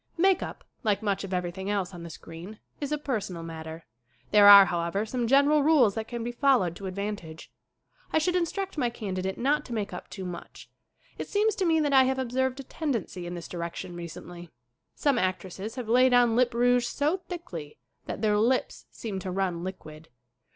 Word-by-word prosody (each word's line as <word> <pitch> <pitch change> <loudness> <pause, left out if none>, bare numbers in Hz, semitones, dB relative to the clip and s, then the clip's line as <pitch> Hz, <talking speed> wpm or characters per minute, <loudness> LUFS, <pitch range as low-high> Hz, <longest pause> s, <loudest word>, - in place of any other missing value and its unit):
Make 380 +2 +4
up, - - -6 0.2
like 210 -2 +1
much 200 -2 0
of 195 - -6
everything 180 +1 -3
else 195 -2 -1
on 175 - -8
the 170 - -8
screen, 165 +6 -10 0.2
is 285 -1 -4
a 300 - +1
personal 210 - -3
matter. 160 0 -8 0.5
There 205 -1 +7
are, 200 -1 +11
how 170 -2 -1
ever, 195 +5 -1
some 240 +1 -2
general 285 +4 +5
rules 280 -8 +4
that 220 +1 -4
can 235 -1 -5
be 240 - -3
followed 240 - +2
to 195 - -6
advantage. 190 -4 -6 0.6
I - - +2
should 355 +3 +1
instruct 365 0 -2
my 245 -3 +2
candidate 190 -5 -4
not 295 +4 +1
to 245 - -7
make 205 -3 -3
up 180 - -8
too 190 -2 -7
much. 180 -1 -9 0.5
It - - -4
seems 425 +1 +2
to 380 - 0
me 325 -2 +3
that 290 -2 +1
I 265 -1 +7
have 265 0 0
ob 260 -3 -3
served 260 +1 0
a - - -5
tendency 235 - -3
in 175 - -5
this 170 - -7
direction 170 0 -6
recently. 175 0 -9 0.5
Some 280 -4 +2
actresses 190 +3 -3
have 250 -4 -5
laid 250 +2 +5
on 240 -2 +4
lip 245 0 +2
rouge 245 0 +3
so 300 +8 0
thickly 175 - -7 0.3
that 205 - -5
their 210 -1 +3
lips 250 +4 0
seem 205 -4 -5
to 190 - -5
run 180 -2 -1
liquid. 160 -4 -8
215 Hz, 200 wpm, -27 LUFS, 180-260 Hz, 0.6 s, are